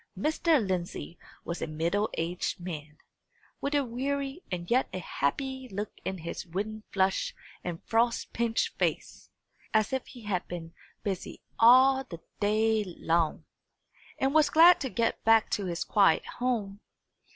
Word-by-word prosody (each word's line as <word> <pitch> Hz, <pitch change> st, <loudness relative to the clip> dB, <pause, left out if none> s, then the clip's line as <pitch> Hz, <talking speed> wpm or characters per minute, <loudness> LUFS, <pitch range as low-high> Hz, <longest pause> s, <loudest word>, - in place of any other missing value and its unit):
Mr. 310 Hz, -, +2 dB
Lindsey 175 Hz, -2 st, -4 dB, 0.3 s
was 170 Hz, 0 st, -4 dB
a -, -, -2 dB
middle 170 Hz, +7 st, 0 dB
aged 170 Hz, +3 st, -2 dB
man, 155 Hz, -4 st, -7 dB, 0.6 s
with 285 Hz, +1 st, -1 dB
a 285 Hz, -2 st, +2 dB
weary 275 Hz, +5 st, -3 dB
and 175 Hz, +1 st, -4 dB
yet 255 Hz, +2 st, +3 dB
a -, -, -4 dB
happy 260 Hz, -, -2 dB
look 205 Hz, +1 st, -4 dB
in 190 Hz, -, -3 dB
his 170 Hz, 0 st, -5 dB
wind 205 Hz, +5 st, -4 dB
flushed 190 Hz, -1 st, +1 dB, 0.3 s
and 170 Hz, -2 st, -5 dB
frost 235 Hz, +1 st, +1 dB
pinched 230 Hz, -1 st, 0 dB
face, -, -, -2 dB, 0.5 s
as 215 Hz, +2 st, +2 dB
if 265 Hz, -, -2 dB
he 245 Hz, -3 st, -12 dB
had 195 Hz, -4 st, -2 dB
been 165 Hz, -1 st, -7 dB, 0.3 s
busy 195 Hz, -4 st, -4 dB, 0.2 s
all 260 Hz, +3 st, +7 dB
the 175 Hz, -10 st, -9 dB, 0.2 s
day 215 Hz, +1 st, +2 dB
long, 165 Hz, -1 st, 0 dB, 0.7 s
and 270 Hz, +1 st, +1 dB
was 310 Hz, -1 st, +5 dB
glad 340 Hz, +3 st, +7 dB
to 265 Hz, -, -2 dB
get 230 Hz, -1 st, -1 dB
back 225 Hz, -1 st, +4 dB
to 200 Hz, -, -1 dB
his 170 Hz, -1 st, -2 dB
quiet 200 Hz, -2 st, +3 dB
home. 220 Hz, -6 st, -2 dB
215 Hz, 150 wpm, -29 LUFS, 175-255 Hz, 0.7 s, all